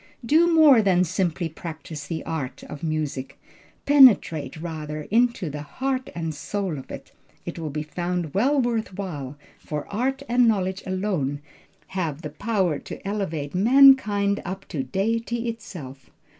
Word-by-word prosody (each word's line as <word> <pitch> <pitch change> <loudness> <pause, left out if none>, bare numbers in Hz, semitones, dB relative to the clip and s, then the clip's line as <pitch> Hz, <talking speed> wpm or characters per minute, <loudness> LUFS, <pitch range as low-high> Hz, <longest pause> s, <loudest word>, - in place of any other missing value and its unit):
"Do 325 +7 +4
more 305 -7 +7
than 185 -3 +3
simply 180 -1 -1
practice 160 -2 -8
the 160 0 -4
art 145 -5 -4
(of 150 - -9
music), 155 -4 -3 0.5
penetrate 240 - +5
rather, 155 -2 -5
into 235 -4 +2
the 150 0 -5
heart 260 - -3
and 165 -2 -3
soul 185 0 -3
of 130 - -12
it. - - -9 0.3
It - - -6
will 160 -2 -4
be 150 +1 -3
found 175 0 -3
well 270 +9 +2
worth 230 -6 -1
while, 145 -8 -5 0.2
for 150 -1 -5
art 265 +5 -1
and 245 0 +4
knowledge 190 -3 0
alone 185 -8 -1 0.5
have 165 -5 -3
the 150 - -5
power 185 -3 0
to - - -9
elevate 165 -8 -3
mankind 210 -2 +5
up 190 +2 -6
to 145 - -2
Deity 230 - -1
itself. 150 - -8
185 Hz, 145 wpm, -24 LUFS, 155-230 Hz, 0.5 s, more